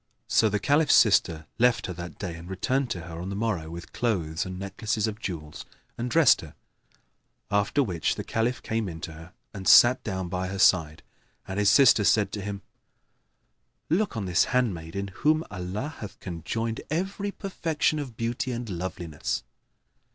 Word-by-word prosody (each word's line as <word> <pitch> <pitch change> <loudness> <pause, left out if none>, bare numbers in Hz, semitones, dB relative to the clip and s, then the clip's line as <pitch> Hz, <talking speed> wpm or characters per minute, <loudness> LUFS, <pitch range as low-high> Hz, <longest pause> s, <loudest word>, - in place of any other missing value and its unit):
So 110 - +4
the 105 - 0
Caliph's 145 +8 +3
sister 85 -7 +4
left 120 0 +3
her 90 - -4
that 85 -3 -8
day 90 -4 -4
and 85 +2 -10
returned 130 +7 0
to 90 -6 -3
her 80 0 -8
on 90 - -5
the 100 - -4
morrow 100 -7 -2
with 85 +1 -9
clothes 95 -7 -1
and 95 0 -6
necklaces 105 +3 -2
of 110 -1 -4
jewels, 80 -8 -6 0.3
and 120 +1 -3
dressed 155 -7 +5
her; 80 -3 -12 1.0
after 100 +8 +2
which 90 - -1
the - - -5
Caliph 115 +3 -1
came 110 -3 -2
in 80 -1 -7
to 85 - -5
her 80 +3 -12 0.2
and 95 -3 -6
sat 125 +1 +7
down 95 -3 -3
by 90 +1 -3
her 100 +1 -5
side, 80 -5 +3 0.4
and 95 +1 -3
his 105 -1 +4
sister 120 -3 +6
said 105 -1 +3
to 105 - -4
him, 100 -1 -5 1.3
"Look 185 - +1
on 105 - -2
this 90 0 +3
handmaid 100 -11 -1
in 100 0 -3
whom 155 - +1
Allah 100 - -4
hath 105 - -8
conjoined 110 +7 -4
every 195 +6 -2
perfection 165 -6 -1
of 130 -6 -7
beauty 120 +2 -2
and 120 0 -4
loveliness." 85 -3 -4
100 Hz, 175 wpm, -27 LUFS, 90-120 Hz, 1.3 s, sat